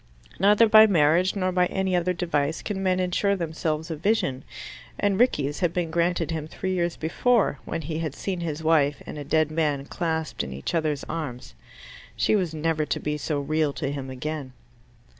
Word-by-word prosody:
Neither 210 +4 +5
by 220 0 +8
marriage 170 +1 +3
nor 185 -2 0
by 180 0 +2
any 190 -1 -1
other 175 +1 +1
device 160 -4 -1
can 195 -2 -3
men 185 -1 +1
insure 185 +2 +1
themselves 160 -2 -3
a - - -2
vision; 150 -7 0 0.5
and 200 -1 +1
Rickie's 145 - +2
had 175 -3 +1
been 170 -3 -2
granted 170 0 0
him 155 -2 -3
three 185 +3 -3
years 175 -2 0
before, 195 - +1
when 165 - -4
he 155 +2 -3
had 155 -4 -3
seen 190 -3 -3
his 160 -2 -4
wife 150 -3 +2
and 150 - -7
a - - -5
dead 155 +1 +1
man 150 -3 0
clasped 160 -1 -2
in 65 - -6
each 65 - -5
other's 155 -4 0
arms. 130 - -6 0.6
She - - +2
was 185 -6 0
never 160 0 0
to - - -2
be 150 0 -2
so 150 0 -2
real 155 0 0
to 140 0 -3
him 135 -2 -5
again. 135 0 -5
160 Hz, 190 wpm, -25 LUFS, 150-180 Hz, 0.6 s, by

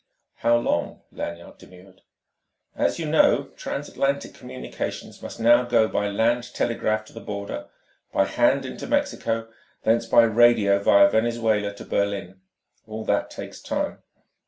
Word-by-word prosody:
"How 120 0 +3
long?" 120 -7 -1
Lanyard 85 0 -7
demurred. 95 +1 -17 0.7
"As - - 0
you 165 - -3
know, 150 -2 +3
transatlantic 140 0 -2
communications 65 -1 -7
must - - -8
now 120 +2 +5
go 120 -2 +3
by 105 -1 -1
land 120 +4 0
telegraph 110 -2 0
to - - -17
the - - -8
Border, 100 -1 -6 0.4
by 95 - +2
hand 135 +6 +2
into 130 - -7
Mexico, 115 - -1 0.4
thence 115 +1 +2
by 120 - +6
radio 110 -3 +4
via 100 0 +6
Venezuela 110 -1 +1
to - - -10
Berlin. 100 -2 -2 0.5
All 110 0 -6
that - - 0
takes - - -9
time. - - -3
110 Hz, 135 wpm, -24 LUFS, 100-120 Hz, 0.7 s, by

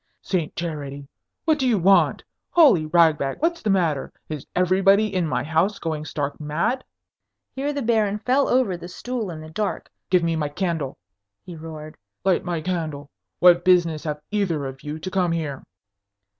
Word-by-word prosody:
"Saint 175 -5 -2
Charity! 145 -4 -5 0.4
What 310 -2 +3
do 260 - +1
you 235 -4 +3
want? 195 +2 +4 0.3
Holy 260 - +5
Ragbag, 155 -4 +3
what's 335 +2 0
the 215 - -1
matter? 165 -8 +1 0.2
Is 150 -3 -6
everybody 195 +3 +3
in 180 -3 +1
my 125 -3 -1
house 160 +7 +1
going 155 -2 -3
stark 145 -2 -3
mad?" 165 - -1 0.7
Here 280 +2 -2
the 285 -2 -3
Baron 215 -3 +2
fell 255 +6 +1
over 250 -7 +2
the 175 0 -8
stool 230 +3 -4
in 160 -2 -7
the 155 0 -10
dark. 210 +5 -3 0.2
"Give 180 -2 +3
me 165 -1 +1
my 150 -2 -1
candle!" 160 -4 -2 0.5
he 175 - -9
roared. 155 -1 -9 0.3
"Light 190 -2 +2
my 175 -3 -2
candle! 155 -5 -4 0.3
What 175 -1 +6
business 170 -4 +3
have 150 -1 -3
either 180 -9 0
of 135 0 -7
you 150 +1 -5
to 185 +4 -6
come 180 -3 +1
here?" 150 -5 -3
170 Hz, 170 wpm, -23 LUFS, 155-200 Hz, 0.7 s, What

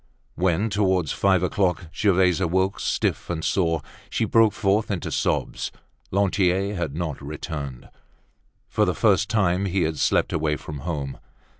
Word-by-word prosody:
When, 95 +4 +1
towards 95 -5 +1
five 95 -2 +2
o'clock, 90 -3 0
Gervaise 95 -3 +3
awoke, 95 +2 +1
stiff - - -1
and 80 -2 -2
sore, 80 -5 +1 0.3
she - - 0
broke 115 -2 +4
forth 100 +2 +1
into 95 -5 -3
sobs. - - -1 0.4
Lantier 95 0 +1
had 85 -7 -3
not 80 -4 -3
returned. 70 -3 -6 0.8
For - - +1
the - - +1
first 100 - +3
time 95 -3 +2
he 95 -1 +1
had 80 -2 -2
slept - - +2
away 75 -1 +1
from 75 0 -7
home. 70 -3 -4
90 Hz, 145 wpm, -24 LUFS, 80-100 Hz, 0.8 s, broke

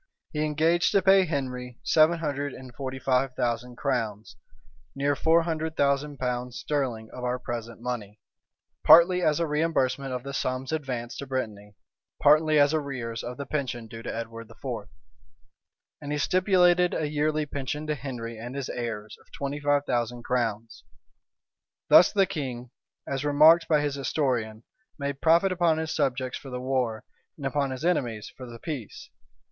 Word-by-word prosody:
He 150 0 0
engaged 160 +3 +2
to 200 - +4
pay 190 0 +6
Henry 125 -5 -4
seven 160 +2 +4
hundred 145 -3 -3
and 130 -1 -11
forty 130 0 -5
five 130 0 0
thousand 120 0 -2
crowns, 110 -6 -2 0.6
near 140 +1 +1
four 165 +3 +3
hundred 160 -1 -3
thousand 140 +1 +1
pounds 125 -1 -3
sterling 125 -7 -2
of 125 - -8
our 125 0 0
present 115 -2 -6
money; 110 -4 -5 0.6
partly 180 +2 +7
as 155 -3 +2
a 170 - +1
reimbursement 150 -4 0
of 125 -1 -4
the 140 - -6
sums 130 0 -2
advanced 130 -6 -4
to 140 - -6
Brittany, 105 -6 -4 0.4
partly 155 +1 +5
as 145 +1 +4
arrears 130 -7 -3
of 125 +1 -6
the 140 - -5
pension 130 -5 -3
due 115 0 -9
to - - -5
Edward 115 0 -6
IV. 115 -3 -6 1.1
And 145 - -6
he 150 - 0
stipulated 180 +1 +3
a 155 - -1
yearly 150 +1 0
pension 145 +1 -4
to 155 - 0
Henry 120 -5 -6
and 120 +3 -7
his 140 -2 -4
heirs 110 -3 -5
of - - -27
twenty 140 +1 -4
five 145 0 +1
thousand 120 -1 -2
crowns. 115 -3 -2 1.1
Thus 175 - +8
the 195 -2 +3
king, 130 -9 -5 0.4
as 135 0 -2
remarked 155 +3 +6
by 150 -2 +3
his 145 -1 -1
historian, 125 -6 -1 0.3
made 140 -1 -4
profit 170 +4 +4
upon 170 -3 +2
his 160 0 -2
subjects 130 -1 -1
for 135 - -10
the 125 -1 -4
war, 125 -4 -1 0.3
and 140 - -7
upon 140 0 0
his 130 +4 -5
enemies 120 -11 -1
for 125 - -9
the 115 - -9
peace. 130 -5 -7
135 Hz, 165 wpm, -27 LUFS, 120-150 Hz, 1.1 s, Thus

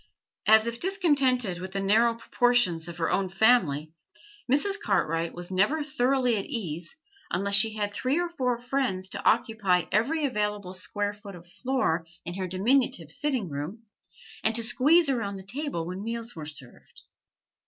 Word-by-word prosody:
As 220 +1 +7
if 235 0 -4
discontented 275 - +1
with 185 +1 -7
the 195 - -1
narrow 225 +4 +3
proportions 230 -8 +1
of 170 -1 -8
her 165 -1 0
own 195 -1 +1
family, 180 - +2 0.6
Mrs. 395 +9 +2
Cartwright 165 -5 0
was 175 +1 -5
never 210 +12 +2
thoroughly 260 -4 +1
at 195 - -3
ease 170 - -4 0.3
unless 200 +3 -1
she 215 +2 +5
had 205 -1 -2
three 255 - 0
or 350 - 0
four 255 -8 -1
friends 240 -7 -2
to 200 - -3
occupy 220 -6 +2
every 280 +10 +1
available 210 -6 -2
square 205 +2 -3
foot 205 -2 -11
of 170 0 -13
floor 180 -4 -1 0.2
in 175 - -5
her 185 0 -3
diminutive 190 - +1
sitting 260 - -1
room, 155 +10 -6 0.6
and 220 0 +2
to 230 - 0
squeeze 285 +8 +4
around 225 -7 -1
the 190 - -8
table 230 - -3
when 185 +3 -5
meals 230 +1 -5
were 155 -2 -7
served. 140 -5 -9
210 Hz, 165 wpm, -27 LUFS, 185-250 Hz, 0.6 s, As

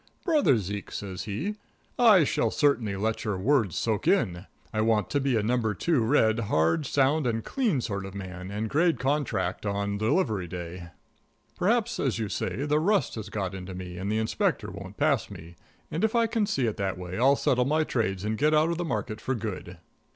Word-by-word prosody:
"Brother 300 - +4
Zeke," 100 0 -5
says 95 -2 -5
he, 160 - -3 0.4
"I 215 -8 +7
shall 150 +1 +1
certainly 125 -9 +1
let 110 +3 -1
your 105 -4 -1
words 110 - +2
soak 110 -3 -1
in. 95 - +1 0.3
I 110 - +1
want 110 -1 +1
to 145 - +2
be 135 -3 +1
a 105 - 0
number 115 -2 0
two 160 - +1
red, 110 -2 +3
hard, 85 - +1
sound 140 +1 +2
and 115 -1 -1
clean 220 - 0
sort 100 -4 -3
of 95 - -10
a - - -4
man, 90 -1 -7
and 105 +2 -3
grade 165 +7 +2
contract 140 +1 -1
on 100 0 -2
delivery 110 - +1
day. 85 0 -7 0.7
Perhaps, 230 +4 +1
as 135 -5 0
you 110 -3 -2
say, 135 +7 -2
the 150 +1 +2
rust 200 +5 +1
has 110 -3 -6
got 95 -3 -3
into 95 -1 -7
me 90 -1 -7
and 100 +2 -2
the 110 - +1
Inspector 110 -4 0
won't 95 +1 -9
pass 145 -4 +1
me, 85 -3 -11 0.4
and 165 - -2
if 220 +1 +1
I 230 -1 +4
can 225 -2 0
see 140 - 0
it 110 - -2
that 95 -2 -2
way 90 +2 -6
I'll 135 +3 +5
settle 125 -2 +2
my 155 +3 +2
trades 105 -9 -1
and 110 0 -2
get 150 +1 +3
out 155 +2 +3
of 170 - -3
the - - 0
market 110 -8 -3
for 130 - -1
good." 100 -5 -5
110 Hz, 210 wpm, -27 LUFS, 100-150 Hz, 0.7 s, I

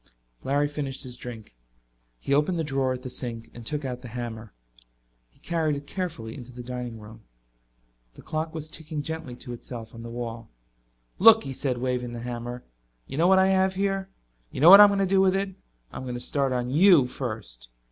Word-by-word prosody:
Larry 145 +2 +1
finished 145 -2 -4
his 125 -2 -7
drink. 115 - -9 0.6
He 135 - -2
opened 150 +5 +2
the 165 - 0
drawer 135 -3 0
at 125 0 -4
the 130 - -5
sink 115 -3 -5
and 120 - -10
took 150 -2 -2
out 125 -1 -4
the 125 - -9
hammer. 115 -2 -6 0.8
He - - -29
carried 160 -3 0
it 140 0 -7
carefully 145 -11 -5
into 125 -1 -10
the 125 0 -9
dining 125 -2 -5
room. 110 +1 -12 0.9
The - - -13
clock 155 0 -3
was 160 -1 -7
ticking 155 -2 -5
gently 160 -5 -5
to 125 0 -8
itself 115 -1 -8
on 115 - -9
the 115 - -8
wall. 115 -1 -6 0.7
"Look," 225 +3 +8
he 135 - -5
said, 130 -1 -2
waving 125 -1 -2
the 120 - -6
hammer. 120 0 -5 0.4
"You 140 - -6
know 170 - +5
what 190 0 +6
I 190 0 +5
have 190 0 +2
here? 195 0 -1 0.4
You - - -7
know 165 +6 +9
what 200 +1 +12
I'm 205 - +9
going 200 - 0
to - - +3
do 190 +1 +3
with 190 0 +4
it? 195 0 -1 0.4
I'm - - -7
going 125 -1 -5
to - - -4
start 135 +1 0
on 125 0 -1
you 165 -2 +6
first." 110 - -6
130 Hz, 210 wpm, -26 LUFS, 120-160 Hz, 0.9 s, what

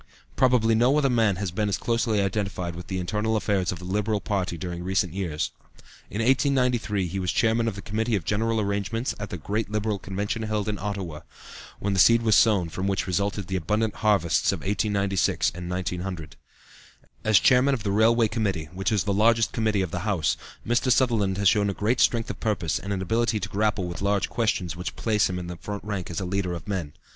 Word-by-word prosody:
Probably 125 -3 +3
no 120 +6 +3
other 140 -3 +2
man 110 -5 +3
has 95 -1 -3
been 105 +3 -1
as 100 - 0
closely 115 -3 0
identified 95 -3 -2
with 85 - -8
the 95 - -3
internal 105 +5 -1
affairs 100 -3 0
of 90 - -5
the 90 - -10
Liberal 105 +3 0
party 95 -2 -2
during 85 +1 -5
recent 95 -1 0
years. 85 -6 -2 0.6
In 110 +2 -2
1893 125 -6 +2
he 95 +3 -3
was 90 -2 -1
Chairman 115 0 +2
of 110 - -2
the 100 - -8
Committee 110 +3 -1
of 90 -6 -3
General 110 +2 0
Arrangements 105 +4 -1
at 105 -1 -5
the 90 - -5
great 105 +7 -2
Liberal 105 -1 -1
convention 100 +4 -3
held 110 -1 -2
in 105 -2 -2
Ottawa, 95 -6 -4 0.6
when 100 0 -2
the 95 - 0
seed 115 +4 +6
was 110 -1 +3
sown 100 -5 +4
from 95 +4 -3
which 100 0 0
resulted 100 +2 -1
the 95 +2 -4
abundant 105 +5 -1
harvests 100 -6 +2
of - - -4
1896 100 -1 +1
and 90 0 -7
1900. 90 -3 -4 0.9
As 110 -2 +5
Chairman 130 +5 +4
of 115 - -7
the 100 - -1
Railway 115 +2 +4
Committee, 95 -9 -2
which 95 +3 -1
is 105 -3 +2
the 100 - 0
largest 115 +2 +3
committee 110 -3 +1
of 90 - -4
the 90 - -2
House, 95 -5 0 0.3
Mr. 120 +2 +2
Sutherland 110 -7 +2
has 100 0 +2
shown 100 +1 +3
a 100 - -3 0.2
strength 115 -1 +2
of - - -10
purpose 90 -8 -1
and 100 - -6
an 95 -2 -2
ability 115 +3 +1
to 100 0 -4
grapple 105 -1 0
with 85 -1 -6
large 100 0 +1
questions 105 -7 -1
which 90 +1 -5
place 105 -3 +1
him 90 - -3
in 90 - -5
the 90 0 -7
front 100 +3 -6
rank 100 -3 -4
as 85 - -3
a 95 - -3
leader 90 -1 -1
of 85 -3 -7
men. 90 -7 -3
100 Hz, 210 wpm, -25 LUFS, 95-110 Hz, 0.9 s, seed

